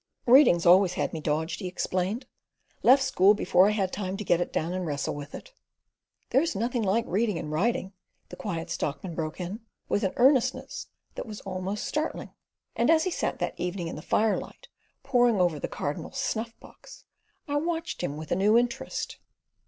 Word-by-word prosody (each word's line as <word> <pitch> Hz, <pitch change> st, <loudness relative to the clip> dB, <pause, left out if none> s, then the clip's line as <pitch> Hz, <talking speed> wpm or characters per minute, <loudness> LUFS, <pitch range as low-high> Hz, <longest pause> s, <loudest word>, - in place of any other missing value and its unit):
"Reading's 245 Hz, -, +6 dB
always 180 Hz, +1 st, +6 dB
had -, -, -2 dB
me 160 Hz, -, -4 dB
dodged," 155 Hz, +2 st, -1 dB
he 190 Hz, -, -4 dB
explained. 185 Hz, +6 st, -2 dB, 0.6 s
"Left 265 Hz, +2 st, +6 dB
school 200 Hz, -3 st, +4 dB
before 185 Hz, -1 st, +4 dB
I -, -, +4 dB
had 200 Hz, -3 st, -1 dB
time 190 Hz, -1 st, -3 dB
to 210 Hz, -, -4 dB
get 175 Hz, -3 st, +2 dB
it -, -, -2 dB
down 165 Hz, +3 st, -1 dB
and 185 Hz, 0 st, -2 dB
wrestle 145 Hz, -4 st, -2 dB
with 145 Hz, 0 st, -8 dB
it." -, -, -11 dB, 0.8 s
"There's 320 Hz, +4 st, +2 dB
nothing 235 Hz, +3 st, -1 dB
like 220 Hz, +3 st, +1 dB
reading 210 Hz, 0 st, 0 dB
and 150 Hz, -2 st, -5 dB
writing," 190 Hz, +3 st, 0 dB, 0.4 s
the -, -, -8 dB
Quiet 175 Hz, -4 st, -4 dB
Stockman 165 Hz, +4 st, -3 dB
broke 160 Hz, 0 st, -4 dB
in, 185 Hz, +4 st, -4 dB, 0.3 s
with 205 Hz, -, +1 dB
an 190 Hz, -, 0 dB
earnestness 270 Hz, -, +2 dB, 0.3 s
that -, -, -6 dB
was 210 Hz, -1 st, -8 dB
almost 190 Hz, +2 st, -4 dB
startling; 305 Hz, +1 st, -3 dB, 0.4 s
and 235 Hz, -, +2 dB
as 320 Hz, -1 st, +5 dB
he 370 Hz, -, -1 dB
sat -, -, -2 dB
that -, -, -3 dB
evening 175 Hz, -1 st, -3 dB
in -, -, -6 dB
the 155 Hz, -, -7 dB
firelight 225 Hz, -, -1 dB, 0.3 s
poring 245 Hz, -5 st, +3 dB
over 175 Hz, -4 st, +2 dB
the -, -, -3 dB
"Cardinal's 145 Hz, -, -5 dB
Snuff 230 Hz, -3 st, -3 dB
box," -, -, -15 dB, 0.4 s
I 290 Hz, 0 st, 0 dB
watched 330 Hz, +1 st, -2 dB
him 150 Hz, -5 st, -3 dB
with 155 Hz, 0 st, -8 dB
a -, -, +3 dB
new 205 Hz, +5 st, +4 dB
interest. 240 Hz, 0 st, -2 dB
195 Hz, 185 wpm, -27 LUFS, 175-240 Hz, 0.8 s, Reading's